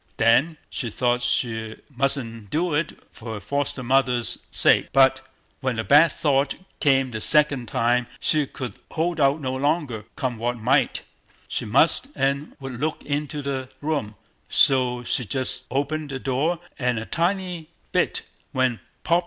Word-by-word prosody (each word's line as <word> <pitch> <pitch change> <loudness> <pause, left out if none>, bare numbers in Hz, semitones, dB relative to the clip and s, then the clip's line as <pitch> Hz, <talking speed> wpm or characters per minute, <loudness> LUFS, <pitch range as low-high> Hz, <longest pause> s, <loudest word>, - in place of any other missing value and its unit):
Then 130 +9 +3
she 120 - -3
thought 120 +2 0
she 110 -3 -1 0.2
mustn't 120 -5 0
do 170 - 0
it 150 +2 -1
for 115 -1 -7
her - - -5
foster 140 +4 -2
mother's 125 -1 +1
sake; - - +4
but 135 -1 +5 0.4
when 130 -3 -1
the 115 - -2
bad 145 - +6
thought 140 -2 +1 0.2
came 135 -3 +3
the 110 -2 -4
second 145 -5 +3
time 120 +2 +1
she 150 -3 +1
could 125 -6 -6 0.2
hold 165 +1 -1
out 140 +1 +3
no 130 -3 -3
longer; 140 -6 -1
come 130 -4 -3
what 120 +1 -1
might, 130 +3 +1 0.4
she - - -3
must 140 - +3
and 140 +2 -1
would 135 -3 -7
look 155 +2 -2
into 145 0 -2
the 135 -2 -3
room; 145 -8 -2 0.3
so 125 -2 +3
she 125 - 0
just 130 +4 -2
opened 145 +3 -2
the 135 - -3
door 140 +6 0 0.2
a 125 -3 0
tiny 175 -1 -1 0.2
bit, - - +1 0.3
when—POP! 130 +6 0
135 Hz, 150 wpm, -24 LUFS, 120-150 Hz, 0.4 s, bad